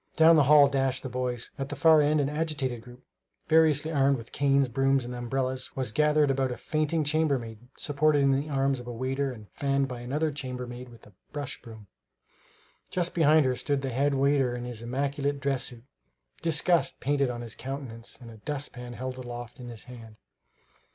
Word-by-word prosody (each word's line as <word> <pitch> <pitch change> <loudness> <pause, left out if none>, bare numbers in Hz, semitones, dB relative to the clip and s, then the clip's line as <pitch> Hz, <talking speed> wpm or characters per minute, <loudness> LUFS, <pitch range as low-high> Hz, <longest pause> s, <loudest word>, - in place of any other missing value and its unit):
Down 160 +1 +7
the 150 -3 +5
hall 145 0 +7
dashed 135 -2 0
the 130 - -4
boys. 125 -1 -3
At 135 0 -3
the 145 - -4
far 155 +2 +6
end 150 +1 +3
an 140 - +1
agitated 150 -5 -2
group, 125 +1 -15 0.4
variously 155 -1 +4
armed 140 -2 +3
with 115 -1 -11
canes, 140 -1 +2
brooms 135 +1 +1
and 125 - -6
umbrellas, 130 +1 -3
was 130 -4 -1
gathered 150 +2 +3
about 135 -1 0
a 125 - -4
fainting 155 +1 0
chambermaid 140 -7 0 0.2
supported 145 0 +2
in 135 - +4
the 140 +3 0
arms 135 -1 +1
of 120 - -10
a - - -4
waiter 130 +3 -2
and 110 -4 -11
fanned 140 -1 0
by 125 -2 -6
another 150 +6 -1
chambermaid 125 -3 -6
with 115 -1 -16
a 105 - -18 0.2
brush 145 -2 -5
broom. 110 -3 -12 1.0
Just 175 -1 -1
behind 155 -2 +5
her 130 -1 +1
stood 140 +1 -1
the 135 - -2
head 140 +3 +1
waiter 135 -2 +2
in 120 - -5
his 120 -2 -5
immaculate 140 +3 -2
dress 135 -1 0
suit, 120 -2 -4 0.6
disgust 165 -2 +2
painted 140 0 +1
on 120 -1 -4
his 115 -2 -5
countenance 130 -4 -7
and 120 -2 -11
a 110 - -12
dustpan 125 -1 -5
held 130 +1 -5
aloft 120 -1 -8
in 120 -1 -8
his 115 -2 -9
hand. 115 -3 -12
135 Hz, 190 wpm, -28 LUFS, 125-145 Hz, 1.0 s, Down